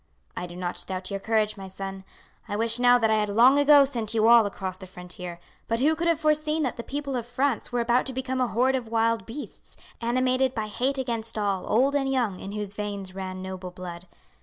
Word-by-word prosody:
"I 180 - -4
do 175 - -11
not 180 -1 -4
doubt 185 0 -5
your 195 - -2
courage, 215 0 0
my 195 -1 -8
son. 195 0 -7 0.4
I 205 - -3
wish 230 +2 0
now 245 0 +6
that 225 -2 +2
I 215 - +3
had 210 -1 0
long 245 +7 +6
ago 285 -1 +7
sent 230 -5 -3
you 220 0 +4
all 230 -2 +7
across 190 -2 -5
the 190 - -10
frontier; 180 -1 -7 0.3
but 230 - 0
who 290 +6 +3
could 335 +2 -1
have 335 -2 +2
foreseen 305 0 +1
that 255 - -1
the - - -5
people 280 +2 -4
of 245 - -1
France 255 +1 -1
were 245 -1 0
about 240 +2 +2
to 265 - -4
become 260 0 -2
a 250 - +2
horde 255 +4 +2
of 250 -3 -3
wild 230 0 +1
beasts, 275 +6 -9 0.2
animated 255 +2 +1
by 220 - -1
hate 255 +6 -1
against 230 -4 -2
all, 200 -3 -1
old 260 +6 +3
and 275 -2 +1
young, 235 -8 0
in 195 - -7
whose 210 -1 -4
veins 200 -2 -5
ran 185 -1 -6
noble 185 -1 -6
blood. 180 0 -9
230 Hz, 230 wpm, -26 LUFS, 195-260 Hz, 0.4 s, ago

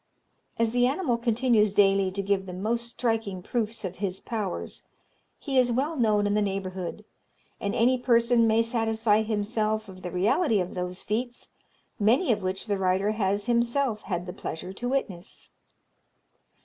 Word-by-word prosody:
As 230 -1 +1
the 245 +1 +3
animal 275 -2 0
continues 235 -3 +2
daily 195 -1 +4
to 195 +1 -4
give 195 -1 0
the 180 - -6
most 230 +5 -2
striking 225 -6 -2
proofs 225 -1 -2
of 185 0 -5
his 190 -1 -3
powers, 210 -5 -4 0.6
he 270 -3 0
is 245 -1 +3
well 280 +7 0
known 215 -5 +2
in 205 - +1
the 210 - +2
neighbourhood, 190 0 -4 0.5
and 205 -2 -2
any 250 +2 +3
person 235 -1 +3
may 225 +1 +3
satisfy 225 -2 +1
himself 215 0 -1
of 185 -1 -11
the 180 - -5
reality 210 - +2
of 180 0 -3
those 180 0 -4
feats, 240 +3 -3 0.5
many 240 - +3
of 210 -2 0
which 185 0 -3
the 205 -3 -1
writer 190 +2 +1
has 200 -1 0
himself 235 -1 +1
had 175 -3 -3
the 180 - -6
pleasure 180 0 -6
to 245 +5 -4
witness. 200 -9 -4
215 Hz, 160 wpm, -27 LUFS, 195-235 Hz, 0.6 s, daily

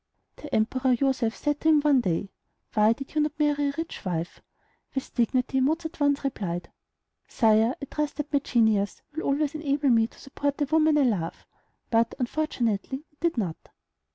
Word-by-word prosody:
The 300 - -10
Emperor 255 +4 +2
Joseph 255 -3 0
said 295 -1 -1
to 320 - +3
him 305 -2 +5
one 285 -3 +4
day, 190 0 -1 0.4
"Why 215 0 +5
did 275 +3 -9
you 305 - +2
not 300 0 -1
marry 295 -1 +2
a - - -4
rich 325 0 -5
wife?" 170 -2 -3 0.5
With 270 - -4
dignity 250 +2 +1
Mozart 315 +6 +1
at - - -18
once 285 -1 +2
replied, 185 -10 -3 0.6
"Sire, 225 +2 +3
I - - -5
trust 300 +1 -3
that 295 0 -5
my 285 - +4
genius 220 -6 +1
will 315 - -3
always 290 +1 0
enable 290 -2 0
me 225 -2 +4
to - - -20
support 285 +1 -3
the 290 - +1
woman 310 +1 +3
I 290 - +4
love"; 195 -10 -1 0.5
but 230 0 +2
unfortunately 260 -1 -2
it 295 - -36
did 335 -4 0
not. 180 -8 -3
270 Hz, 180 wpm, -26 LUFS, 225-295 Hz, 0.6 s, him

